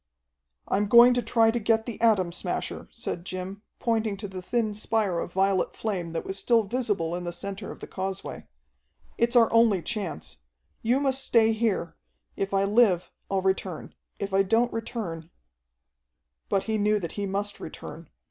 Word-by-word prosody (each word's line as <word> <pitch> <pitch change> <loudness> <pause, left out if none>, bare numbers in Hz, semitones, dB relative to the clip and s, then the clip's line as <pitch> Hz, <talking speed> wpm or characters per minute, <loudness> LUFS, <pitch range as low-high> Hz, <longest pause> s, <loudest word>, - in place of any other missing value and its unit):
"I'm 205 +2 +1
going 240 +3 +8
to 245 - +1
try 225 -2 +3
to 240 - -1
get 225 0 +2
the 235 -3 -6
Atom 205 -7 +3
Smasher," 175 - -4
said 170 - -5
Jim, 185 +2 -5 0.2
pointing 225 -4 0
to 205 +1 -5
the 190 -1 -7
thin 220 +2 -1
spire 210 -4 0
of 175 - -5
violet 195 0 +1
flame 180 -6 -3
that 165 - -3
was 195 0 -4
still 230 +3 +3
visible 205 -7 -1
in 180 - -4
the 175 - -3
center 195 +3 -6
of - - -9
the - - -5
causeway. 190 0 -5 0.7
"It's 235 +1 +2
our 230 -2 +5
only 225 -6 +4
chance. 200 -10 -4 0.4
You 245 +4 +2
must 270 -1 +1
stay 225 -3 +4
here. 215 -7 -1 0.4
If 195 - -2
I 195 0 +2
live, 200 -4 +3 0.2
I'll 195 -1 0
return. 190 -3 -2 0.2
If 200 -1 -4
I 195 - +5
don't 225 +5 +2
return 185 -8 -5 0.6
" - - -54
But 195 -2 +1
he 220 0 -1
knew 210 +1 +3
that 170 -4 -5
he 205 -1 -3
must 200 +1 -3
return. - - -9
200 Hz, 175 wpm, -27 LUFS, 185-225 Hz, 0.7 s, going